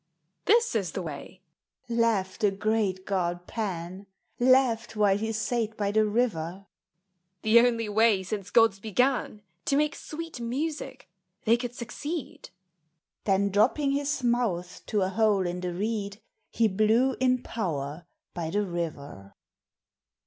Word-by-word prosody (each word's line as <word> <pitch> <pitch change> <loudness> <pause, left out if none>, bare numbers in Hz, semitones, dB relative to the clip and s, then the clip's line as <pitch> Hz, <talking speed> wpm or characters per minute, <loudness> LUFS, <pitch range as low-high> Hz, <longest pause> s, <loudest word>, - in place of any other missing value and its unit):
"This 465 +3 +4
is 195 -8 -1
tbt? 190 - -3
way," 160 +4 -8 0.5
laughed 230 -5 0
the 210 - +4
great 195 -1 -1
god 175 -2 -1
Pan, 190 -3 -5 0.3
(Laughed 245 -3 +3
while 205 -2 +4
he 220 +2 -2
sate 220 0 -1
by 200 -1 0
the 215 0 +3
river 195 -5 -1 0.2
!) 185 +2 -52
" 180 +1 -51
The 220 +2 +6
only 230 -2 +2
way 210 -2 +3
since 195 0 -5
gods 225 -4 +4
began 225 0 0 0.2
To 275 - +1
make 300 +1 +2
sweet 325 -3 -7
music, 270 +1 -4 0.4
they 225 - +5
could 245 0 -5
succeed." 290 +6 -6 0.8
Then 200 0 +2
dropping 260 +8 +3
his 280 -1 -1
mouth 210 -8 0
to 210 -3 +1
a 185 - 0
hole 205 -2 +2
in 175 0 -3
the 180 0 -3
reed, 200 +2 -3 0.3
He 230 - +2
blew 220 +6 +2
in 255 -1 +2
power 160 -6 -4 0.3
by 165 -2 -3
the 205 +4 0
river. 150 - -6
215 Hz, 140 wpm, -27 LUFS, 185-240 Hz, 0.8 s, The